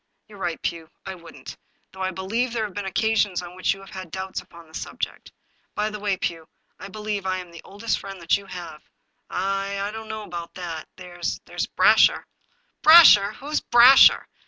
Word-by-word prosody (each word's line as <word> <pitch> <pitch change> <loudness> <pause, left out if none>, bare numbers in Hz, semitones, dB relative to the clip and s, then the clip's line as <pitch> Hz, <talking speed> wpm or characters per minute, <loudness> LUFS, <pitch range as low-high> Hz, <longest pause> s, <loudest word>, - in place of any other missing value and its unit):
" - - -51
You 215 - -15
are - - -14
right, 170 -3 -3
Pugh, 165 -2 -4 0.2
I 190 - -5
wouldn't, 170 -2 -12 0.4
though 190 - -11
I 185 - 0
believe 215 +7 -2
there 230 -2 -1
have 210 -3 -5
been 205 0 -5
occasions 205 -3 0
on 175 0 -10
which 185 +1 0
you 195 - -14
have 195 - -14
had 185 -2 -8
doubts 190 +2 -5
upon 170 -1 -16
the 160 - -22
subject. - - -6 0.4
By 210 +1 -1
the 210 - -7
way, 200 -2 -1
Pugh, 165 -3 -4 0.3
I - - -8
believe 210 0 -4
that 190 -1 -2
I - - -2
am 180 -2 -9
the 170 - -12
oldest 210 +3 -3
friend 195 0 -9 0.2
you 200 0 -7
have." 170 -4 -9
^ - - -36 0.3
" - - -49
I— 195 +1 -2
I 200 +1 -3
don't.know 220 0 -7
about 170 -3 -8
that. 170 -3 -6
There's— 175 -1 -5
there's - - -4
Brasher." - - +4 0.3
" - - -45
Brasher! 310 -11 +8
Who's 295 +3 -3
Brasher? 245 +3 +7
195 Hz, 210 wpm, -23 LUFS, 180-215 Hz, 0.4 s, Brasher